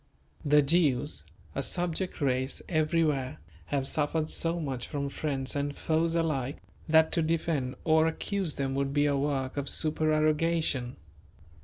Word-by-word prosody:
The 150 0 +5
Jews, 140 - +1 0.3
a 135 - -2
subject 175 +4 -2
race 130 -1 0
everywhere, 155 -5 +1 0.3
have 135 -2 0
suffered 155 +2 0
so 170 +1 +2
much 135 -6 -4
from 140 -2 -3
friends 135 -2 -2
and 145 0 -2
foes 165 +1 +1
alike, 150 -5 -1 0.3
that 160 0 +5
to 165 - +1
defend 155 -5 -1
or 160 0 +4
accuse 180 0 -2
them 135 -1 -2
would 140 +1 -1
be 145 0 +3
a 145 -1 +2
work 135 -1 -1
of 140 -1 -1
supererogation. 155 -3 +1
150 Hz, 140 wpm, -29 LUFS, 135-160 Hz, 0.3 s, The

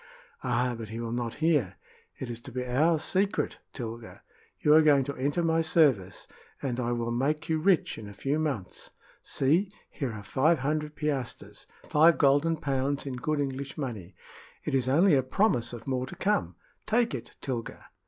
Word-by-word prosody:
"Ah, 125 0 +1
but 115 -1 -7
he 110 +1 -6
will 115 -1 -4
not 120 -1 -3
hear! 135 - +2 0.4
It 125 -2 -5
is 115 - -5
to 130 - -10
be 125 +1 -3
our 150 +7 +3
secret, 195 +6 0
Tilga. 115 -2 -7 0.4
You 150 - +4
are 160 - +8
going 145 -3 +5
to 140 +2 -5
enter 145 +6 0
my 165 0 +2
service, 135 - +2 0.3
and 130 -3 -3
I 120 -1 -1
will 120 -1 -1
make 150 +6 0
you 160 -1 +1
rich 175 0 +2
in 105 -2 -8
a - - -10
few 145 +3 -1
months. 140 -12 -3 0.3
See! 165 +9 +1 0.2
here 135 -5 -3
are 105 -1 -8
five 155 +10 +2
hundred 150 +2 -2
piastres 145 -5 -4 0.2
five 160 +2 +5
golden 145 +3 +3
pounds 140 -1 -1
in 130 -2 -4
good 155 +3 -1
English 140 0 -4
money. 110 - -5 0.5
It - - -2
is 130 -1 +1
only 165 +6 +5
a 135 - +5
promise 130 - +1
of 120 -2 -8
more 130 -1 -1
to - - -8
come. 90 - 0 0.3
Take 230 +1 +2
it, - - -7
Tilga." 120 -4 -5
135 Hz, 185 wpm, -28 LUFS, 120-155 Hz, 0.5 s, are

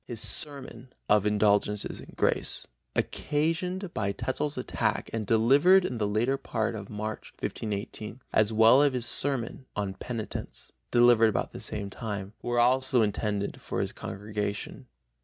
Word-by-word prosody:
His 120 -3 -4
sermon 130 -3 -2 0.2
Of 105 0 +4
Indulgences 105 0 +2
and - - -12
Grace, - - +1 0.3
occasioned 170 +5 -1
by 100 -1 -1
Tetzel's 130 +7 -3
attack 110 -4 -1
and 110 -3 -2
delivered 145 +12 +5
in 125 -7 -3
the 105 - +1
latter 115 +6 +1
part 115 -4 -2
of 105 -2 -7
March, 110 0 -5
1518, 105 +2 -4
as 110 0 +3
well 115 +5 +6
as 145 -2 +3
his 125 -2 -1
sermon 130 -1 -2
Of 95 -2 -3
Penitence, 115 -3 -6 0.2
delivered 120 -2 +6
about 105 - -2
the - - -8
same 100 -1 -3
time, 100 -3 -5
were 120 0 0
also 130 0 +4
intended 105 -1 -2
for - - -3
his - - -1
congregation. 105 +5 -5
115 Hz, 145 wpm, -28 LUFS, 105-130 Hz, 0.3 s, well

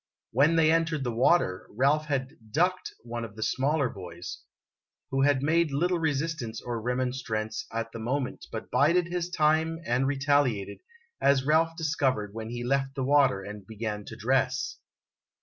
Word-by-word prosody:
When 145 +7 +4
they 160 -1 +5
entered 165 -3 +1
the 120 -2 -2
water, 115 - +2
Ralph 140 +7 +2
had 135 -3 -2 0.2
"ducked" 180 +8 +1
one 120 0 -5
of 110 -2 -8
the 110 - -3
smaller 140 +3 +1
boys, 90 -5 -8 0.7
who 135 0 +1
had 140 -1 +3
made 165 +2 +3
little 170 +5 +1
resistance 145 -7 -2
or 120 -2 -4
remonstrance 125 -3 -2
at 115 0 -3
the 115 - -7
moment, 130 +3 -3
but 110 - -6
bided 170 +4 +3
his 175 0 -2
time 160 -1 +2
and 125 +3 +1
retaliated, 135 -7 +1 0.4
as 135 -1 +3
Ralph 160 +2 +3
discovered 135 - 0
when 110 0 -6
he 120 0 -4
left 135 +2 0
the 135 - -2
water 135 -7 +3
and 105 -1 -9
beofan 105 -2 -5
to - - -7
dress. - - 0
135 Hz, 160 wpm, -28 LUFS, 115-155 Hz, 0.7 s, they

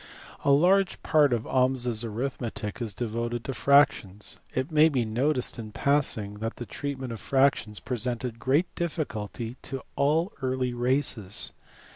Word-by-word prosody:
A - - +2
large 180 +7 +4
part 150 -4 +4
of 120 -2 +1
Ahmes 130 0 +1
s 115 -2 -1
arithmetic 115 -1 -4
is 110 -4 -4
devoted 120 0 -2
to 135 - -2
fractions. 140 -9 +2 0.2
It 130 +6 -1
may 155 +1 +6
be 130 -6 0
noticed 125 +3 0
in 110 -2 -7
passing 110 -8 0
that 115 +1 -3
the 120 - -6
treatment 130 -2 -4
of 110 - -8
fractions 135 -6 +2
presented 120 -1 -3
great 140 +9 +1
difficulty 120 -8 -4
to 135 -1 -6
all 160 +8 +2
early 130 -1 -1
races. 120 -5 0
125 Hz, 145 wpm, -27 LUFS, 115-140 Hz, 0.2 s, may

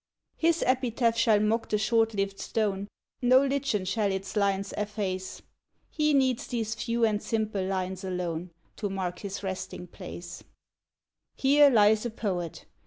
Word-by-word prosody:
His 330 0 +2
epitaph 245 -2 +1
shall 225 -2 +4
mock 220 +2 0
the 210 - +2
short 225 +1 +2
lived 195 0 -2
stone, 200 -3 -1 0.3
No 255 +2 +5
lichen 270 -8 0
shall 200 +1 0
its 190 +2 -4
lines 200 -1 0
efface, 200 -3 -3 0.5
He 300 -1 +2
needs 260 -3 +2
these 225 -2 -2
few 230 0 0
and 210 -1 0
simple 215 -3 -1
lines 190 0 -3
alone 180 -2 -3 0.3
To 205 - -2
mark 185 -2 -3
his 200 0 -6
resting 190 -1 -5
place: 175 -1 -9 0.9
"Here 285 +2 +6
lies 215 -3 +5
a - - -4
Poet. 185 -7 -4
210 Hz, 145 wpm, -28 LUFS, 190-230 Hz, 0.9 s, Here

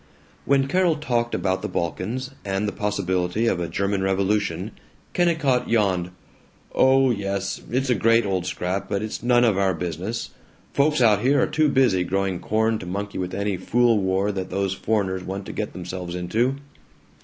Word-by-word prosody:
When 135 0 +3
Carol 175 +2 +2
talked 120 -6 -1
about 95 -1 0
the - - -3
Balkans, 110 +10 -3
and 100 +1 -1
the - - -1
possibility 100 0 -1
of 105 -6 +1
a 85 - -2
German 100 0 -1
revolution, 95 +2 0 0.4
Kennicott 160 -8 +1
yawned, 95 -6 +1 0.6
"Oh 130 0 +4
yes, 100 -2 -2
it's 130 +2 0
a - - +6
great 115 +1 +3
old 95 -2 -1
scrap, 95 +2 -3
but 100 0 -1
it's 110 - -5
none 120 0 +4
of 110 -5 +3
our 95 -2 +2
business. 90 +7 -4 0.4
Folks 150 0 +2
out 105 -3 +5
here 140 +3 +3
are - - +4
too 155 -1 +2
busy 125 -10 +3
growing 95 0 -1
corn 110 +1 0
to 90 - -8
monkey 100 +2 -4
with 90 0 -3
any 100 -1 -1
fool 115 +4 +2
war 95 +1 +1
that 95 -2 -4
those 95 0 -1
foreigners 95 -3 -1
want 95 +1 -5
to - - -7
get 105 - -3
themselves 90 -1 -6
into." 110 +9 0
100 Hz, 175 wpm, -23 LUFS, 95-120 Hz, 0.6 s, a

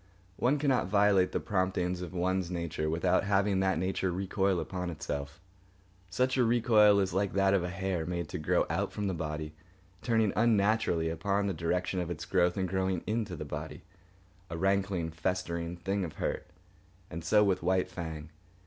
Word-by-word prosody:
One 130 +5 +2
cannot 135 -8 +1
violate 100 -2 +3
the - - -1
promptings 95 -2 -1
of 90 - -6
one's 90 0 -1
nature 85 -3 -2
without 80 +3 +2
having 100 0 +2
that 95 -2 +1
nature 95 +1 -1
recoil 95 0 0
upon 90 0 -4
itself. 70 -3 -5 0.7
Such 130 +8 +1
a 125 - +4
recoil 110 -3 +5
is 95 -2 0
like 100 +1 0
that 95 0 +3
of 95 -3 +2
a 90 - -2
hair, 95 -2 -2
made 85 -2 -3
to - - -4
grow 75 - +2
out 95 +5 -1
from 105 - -3
the 95 - 0
body, 75 -1 -4 0.5
turning 110 -3 +2
unnaturally 105 -6 +2
upon 100 +4 0
the 100 - 0
direction 90 +3 -1
of 90 -1 -3
its 80 -2 -5
growth 90 +2 +2
and 95 -1 0
growing 95 -1 -1
into 110 -4 -2
the - - -6
body—a 95 -1 -10
rankling, 95 -2 0
festering 85 0 -2
thing 95 +2 -2
of 80 - -5
hurt. - - -3 0.6
And 85 +1 -6
so 105 +6 +4
with 100 -3 +1
White 95 +2 +1
Fang. 80 -3 -6
95 Hz, 175 wpm, -30 LUFS, 85-100 Hz, 0.7 s, recoil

